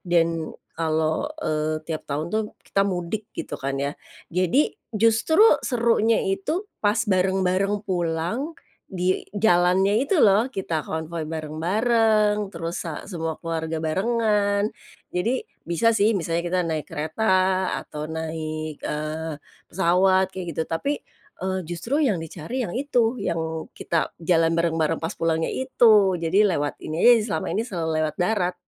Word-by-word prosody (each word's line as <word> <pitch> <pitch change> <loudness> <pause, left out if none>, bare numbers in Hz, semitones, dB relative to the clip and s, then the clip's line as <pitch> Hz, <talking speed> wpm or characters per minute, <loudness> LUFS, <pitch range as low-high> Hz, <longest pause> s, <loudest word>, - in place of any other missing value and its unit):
dan, 170 -2 +2 0.4
kalau, 160 - 0 0.2
eee, 155 0 -1
tiap 160 -2 -4
tahun 150 +2 -2
tuh, 220 0 +2 0.2
kita 195 - 0
mudik, 190 +4 -3
gitu 145 - -5
kan 135 0 -2
ya. 140 - 0 0.4
Jadi, 185 - +2 0.2
justru 230 - +3 0.2
serunya 230 -2 +2
itu 195 - -1 0.2
pas 205 +3 +2
bareng-bareng 190 +1 +1
pulang, 180 - -2 0.4
di 185 0 0
jalannya 195 +2 +3
itu, 315 +3 +2
loh. 215 +5 +4
Kita 165 - -2
konvoi 160 +1 -4
bareng-bareng, 210 +7 +1
terus 165 0 -4
sa 165 +1 -6
semua 165 -4 -4
keluarga 160 -1 -3
barengan. 205 +3 +1 0.4
Jadi, 230 +9 0 0.2
bisa 220 +7 +2
sih, 215 +2 +4
misalnya 170 -3 -1
kita 180 +1 0
naik 160 -3 -2
kereta 155 +8 -3 0.6
atau 150 0 -7
naik, 155 -1 -4
eee, 155 0 -3 0.3
pesawat, 185 +2 +3
kayak 190 -1 -7
gitu. 160 - -1
Tapi, 220 - -1 0.5
eee, 190 +1 -1
justru 175 - -1
yang 205 -11 +1
dicari 165 - -5
yang 175 - -5
itu, 250 -3 +1
yang 170 -7 -2 0.3
kita 165 -2 -1
jalan 165 -1 +3
bareng-bareng 165 -1 +1
pas 165 - -4
pulangnya 165 -1 0
itu. 220 -7 +4
Jadi 180 +6 +3
lewat 145 -3 -1
ini 155 +2 -3
aja 245 - +8
s 220 - 0
selama - - -2
ini 220 - -1
selalu 175 -8 -3
lewat 155 -1 0
darat, 180 -1 +1
180 Hz, 140 wpm, -24 LUFS, 160-210 Hz, 0.6 s, aja